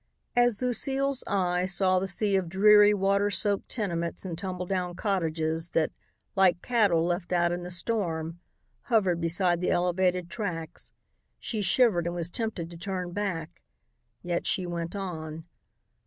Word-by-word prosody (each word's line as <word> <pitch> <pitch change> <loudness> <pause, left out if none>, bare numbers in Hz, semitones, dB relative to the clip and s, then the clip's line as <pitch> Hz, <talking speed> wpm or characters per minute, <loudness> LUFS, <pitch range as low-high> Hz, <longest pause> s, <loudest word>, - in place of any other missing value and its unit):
As 245 -3 +3
Lucile's 270 +2 0
eye 180 -2 +1
saw 185 0 +3
the 190 - -2
sea 200 +2 +1
of 185 -3 0
dreary, 210 +3 +6
water 200 0 +2
soaked 200 +1 0
tenements 170 -6 -3
and 175 -3 -4
tumbledown 180 0 -3
cottages 165 -4 -1
that, 160 - +2 0.4
like 185 -2 +3
cattle 205 -9 +3
left 175 +1 -2
out 175 -1 +2
in 175 0 -2
the 175 - -6
storm, 175 -4 -2 0.5
hovered 190 -9 +2
beside 175 +1 +1
the 180 - 0
elevated 180 0 +1
tracks, 170 -3 -5 0.5
she 220 -3 -4
shivered 195 -3 +3
and 175 - -3
was 170 0 -2
tempted 200 -7 -3
to 170 - -9
turn 180 -1 -4
back 180 -5 -4 0.6
yet 175 -1 -2
she 185 - 0
went 170 +1 -4
on. 160 -5 -5
180 Hz, 145 wpm, -28 LUFS, 170-200 Hz, 0.6 s, dreary